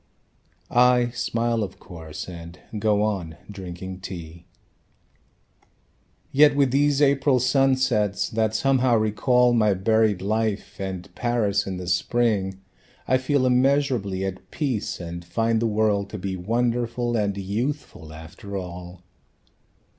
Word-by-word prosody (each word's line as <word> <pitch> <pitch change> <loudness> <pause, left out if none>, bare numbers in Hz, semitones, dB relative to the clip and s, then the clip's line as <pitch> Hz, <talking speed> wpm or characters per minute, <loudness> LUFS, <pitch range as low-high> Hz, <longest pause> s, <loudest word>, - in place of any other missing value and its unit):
I 125 0 +4
smile, 115 -1 -1
of 95 -3 -4
course, 80 -4 -9
And 85 -1 -9 0.2
go 105 0 +2
on 90 -7 -2
drinking 95 -1 -7
tea. 85 -3 -9 1.8
"Yet 145 +1 +5
with 140 -3 +3
these 145 +1 +3
April 140 -1 +3
sunsets, 130 -5 +2
that 110 -1 0
somehow 130 0 +3
recall 120 +3 +3
My 105 -4 +3
buried 110 +1 +2
life, 110 0 -2
and 95 -2 -5
Paris 115 -5 0
in 95 -1 -3
the 90 - -6
Spring, 95 +1 0 0.5
I 130 - +3
feel 130 0 +1
immeasurably 125 -7 +1
at 95 -1 -6
peace, 130 -8 -2
and 85 0 -6
find 115 +6 0
the 115 - +2
world 105 -2 +1
To 105 - -6
be 95 0 -4
wonderful 120 +4 -1
and 100 -3 0
youthful, 105 - -4
after 80 +5 -8
all." 90 -1 -8
110 Hz, 125 wpm, -24 LUFS, 95-125 Hz, 1.8 s, Yet